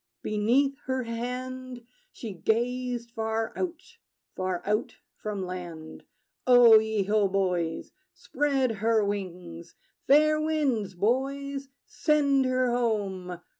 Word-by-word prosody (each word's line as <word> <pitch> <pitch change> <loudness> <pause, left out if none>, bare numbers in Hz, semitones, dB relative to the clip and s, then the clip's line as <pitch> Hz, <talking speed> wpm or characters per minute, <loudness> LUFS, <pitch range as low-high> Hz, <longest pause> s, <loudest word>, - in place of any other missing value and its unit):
Beneath 250 +7 +1
her 260 -1 -1
hand 250 +1 -5 0.3
She 220 -4 -7
gazed 240 +4 -1
far 225 -1 -2
out, 350 -3 -3 0.5
far 185 -1 -2
out 210 +2 -1 0.2
from 205 -3 -5
land. 170 -3 -8 0.4
O 240 -3 +8
ye 220 -2 -1
ho, 205 +1 +2
boys! 180 -4 -1 0.2
Spread 275 -4 0
her 220 -1 +3
wings! 180 -4 -6 0.3
Fair 305 +2 +5
winds, 270 -11 0
boys: 275 +6 -1 0.2
send 285 -3 +2
her 255 -1 +1
home! 195 -7 -2
230 Hz, 105 wpm, -27 LUFS, 195-260 Hz, 0.5 s, O